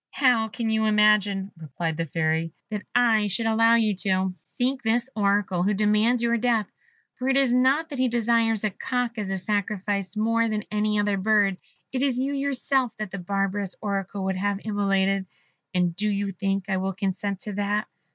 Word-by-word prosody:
"How 250 -5 +3
can 225 +1 -3
you 220 0 +1
imagine," 210 -2 +3
replied 160 +1 -4
the 165 +1 -3
Fairy, 160 +1 -1 0.2
"that 210 -2 -2
I 225 -4 +4
should 225 +4 -2
allow 225 +1 +4
you 220 -3 +2
to 190 -1 0
seek 260 +2 -2
this 235 +3 0
Oracle 200 -3 +1
who 200 +3 +1
demands 215 +4 +2
your 235 0 +2
death? 230 -2 +1 0.5
For 255 +1 -1
it 270 - +3
is 270 -3 +3
not 270 +6 +3
that 280 -4 -6
he 255 - +3
desires 230 -2 +1
a 215 - 0
cock 245 +1 -2
as 205 -2 -3
a 195 - -1
sacrifice 200 0 -2
more 230 +1 +2
than 215 -1 -2
any 210 0 +1
other 205 -1 +1
bird 200 -1 +2 0.3
it 255 - -2
is 270 -3 +1
you 270 +2 -1
yourself 275 -3 0
that 210 -3 -5
the 195 - -5
barbarous 195 +1 -2
Oracle 200 -1 -3
would 190 -1 -1
have 200 +1 -1
immolated; 195 -2 +1 0.4
and 180 -2 0
do 210 +3 -1
you 200 -1 -1
think 195 +1 -2
I 190 -2 0
will 190 +1 -2
consent 195 0 -3
to 210 - -6
that? 205 +1 -1
210 Hz, 190 wpm, -25 LUFS, 195-230 Hz, 0.5 s, I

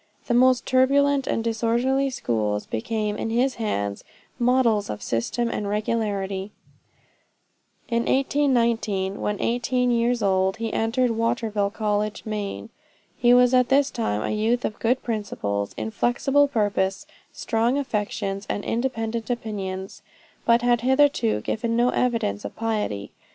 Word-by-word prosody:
The 240 - -1
most 255 +1 +4
turbulent 275 +1 +3
and 225 - 0
disorderly 235 +4 +1
schools, 105 - -1
became, 210 - -2
in - - -3
his 250 +4 +1
hands, 100 - -2 0.4
models 240 -4 +2
of 105 - -5
system 120 - -1
and 205 -1 -3
regularity. 205 -2 -2 1.3
In 235 -1 0
1819, 235 -8 +1
when 210 -1 -2
18 245 +1 0
years 240 0 +1
old, 190 -1 +2
he 225 -1 -3
entered 235 +2 +1
Waterville 225 -3 0
College, 210 0 -2
Maine. 210 -2 -4 0.4
He 240 -2 +3
was 250 0 +5
at 250 -1 +4
this 275 +1 +3
time 110 - -2
a - - -2
youth 225 +3 +1
of 215 - -4
good 245 +3 +1
principles, 105 - -3
inflexible 255 +6 +1
purpose, 205 -6 0 0.3
strong 230 +3 0
affections, 205 -6 -3
and 205 - -3
independent 230 -2 -2
opinions, 195 -5 -4 0.4
but 235 0 +4
had 240 -1 +3
hitherto 260 - +2
given 230 - -2
no 240 +1 +3
evidence 230 - 0
of 105 - -7
piety. 210 - -2
225 Hz, 130 wpm, -24 LUFS, 205-245 Hz, 1.3 s, was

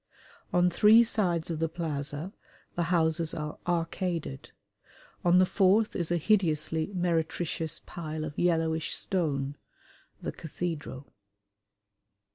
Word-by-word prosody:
On 180 0 +4
three 215 +6 +7
sides 180 -8 0
of 160 - -3
the 165 0 0
plaza 155 +1 -4 0.4
the 175 - 0
houses 165 -2 +1
are 150 -1 -5
arcaded; 170 - -2 0.7
on 175 0 +5
the 185 - +6
fourth 200 +3 +3
is 170 -2 -1
a 175 - +3
hideously 160 -4 +1
meretricious 165 -2 -1
pile 155 -2 -5
of 150 - -6
yellowish 160 -2 +1
stone 145 -6 -1 0.6
the - - -4
cathedral. 155 -4 -5
165 Hz, 110 wpm, -29 LUFS, 155-180 Hz, 0.7 s, three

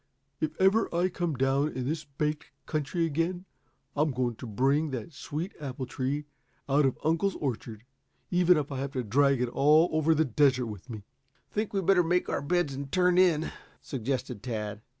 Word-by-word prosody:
If 155 0 -3
ever 195 +4 +4
I 180 +2 +2
come 175 -3 -2
down 135 +3 +1
in 130 -1 -3
this 155 +1 -2
baked 150 +2 -3 0.2
country 155 +2 -1
again, 165 +4 -1 0.5
I'm 150 +2 +2
going 125 -3 -1
to 125 - -8
bring 135 +8 +1
that 130 +3 -5
sweet 155 +4 -5
apple 130 -2 -4
tree 135 +4 -2 0.4
out 140 +1 +4
of 130 - -2
uncle's 165 +5 +1
orchard, 115 -5 -4 0.5
even 180 -1 +5
if 150 -1 -2
I 135 - -3
have 140 +1 -4
to 130 -3 -1
drag 135 +3 +3
it 125 - -1
all 155 +6 +4
over 155 +1 +3
the 160 +1 +3
desert 130 0 +3
with 105 +1 -8
me." 110 -4 -7 0.5
"Think 215 0 -2
we'd 195 -3 -1
better 190 -1 +5
make 175 +1 +1
our - - -1
beds 160 -1 0
and 135 0 -6
turn 180 -1 +3
in?" 165 -4 +3 0.3
suggested 130 -3 -3
Tad. 105 -3 -4
145 Hz, 185 wpm, -29 LUFS, 130-165 Hz, 0.5 s, even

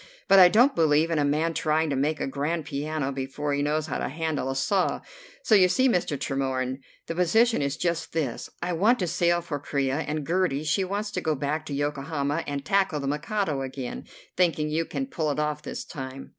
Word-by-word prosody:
But 195 - +7
I 180 - +10
don't 245 +8 +5
believe 160 0 +3
in 160 - +1
a - - +2
man 155 +3 +1
trying 155 0 +1
to - - 0
make 150 +3 0
a - - -1
grand 145 +4 -2
piano 145 -1 -2
before 135 +2 -3
he 140 - 0
knows 150 +1 0
how - - -3
to - - -2
handle 155 -2 -2
a 135 - -2
saw. 190 +7 +1 0.4
So - - +2
you 185 -3 +6
see, 255 +9 +3
Mr. 175 - +1
Tremorne, 130 -1 -2 0.3
the - - -4
position 220 +7 +3
is 140 0 -1
just 170 -1 -1
this. 150 -7 -3
I 175 0 -1
want 210 +9 +3
to 185 - -1
sail 175 0 +2
for 150 -4 -4
Corea, 140 -1 -1
and 155 -2 -3
Gertie, 170 -4 +1
she 155 +5 +1
wants 205 +3 -3
to 185 - -3
go 160 -3 0
back 150 +3 -2
to 140 - -3
Yokohama 145 +1 -2
and 140 -1 -4
tackle 190 -3 +2
the 140 - -4
Mikado 150 +1 -1
again, 130 -1 -5 0.3
thinking 165 -4 +1
you 165 +2 0
can 270 - -3
pull 170 - -2
it 145 - -1
off 150 -1 -1
this - - -6
time." 135 -1 -8
155 Hz, 215 wpm, -26 LUFS, 140-175 Hz, 0.4 s, I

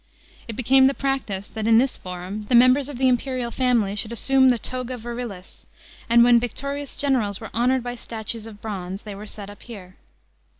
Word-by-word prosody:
It 230 - -6
became 265 +2 +5
the 275 - 0
practice 250 -8 -2
that 220 0 -4
in 225 -1 +6
this 255 +2 +2
Forum, 185 +3 -7
the 245 - +4
members 255 +3 +5
of 285 - -6
tl 265 - -3
e - - +6
imperial 250 -1 0
family 235 -6 +1
should 210 +2 -2
assume 260 +2 +3
the 245 - +3
to.ua 255 +1 -5
virilis; 235 -5 -8 0.4
and 235 0 +6
when 240 0 +6
victorious 280 +4 -5
generals 240 -9 0
were 220 - -9
honoured 250 +2 +1
by 245 0 -4
statues 225 -1 -5
of 210 -2 -13
bronz?, 195 -2 -5
they 210 - -7
were 205 +2 -9
set 205 -1 -8
up 205 - -15
here. 195 -6 -11
235 Hz, 200 wpm, -23 LUFS, 210-255 Hz, 0.4 s, in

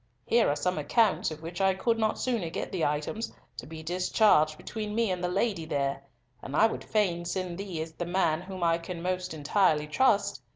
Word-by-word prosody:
Here 235 0 +3
are 145 - +1
some 180 +2 -1
accounts 210 +8 +2
of 155 0 -9
which 170 +3 -5
I 190 -1 +3
could 230 +4 0
not 220 -1 +1
sooner 230 -10 -1
get - - -4
the 180 -4 -1
items, 150 +10 -1 0.3
to - - -7
be 160 0 -8
discharged 175 -2 +3
between 215 +2 -5
me 230 -3 +2
and 180 -1 -3
the - - +2
lady 195 -1 0
there—and 135 -3 -5
I 220 - +6
would 225 - -1
fain 185 -5 0
send 180 0 -3
thee 190 -5 -4
as 160 - -10
the 175 +1 -5
man 175 -3 +1
whom 185 -1 -6
I 165 0 +3
can 170 0 -7
most 185 0 -2
entirely 155 0 +2
trust. 215 +7 +2
180 Hz, 205 wpm, -28 LUFS, 160-205 Hz, 0.3 s, I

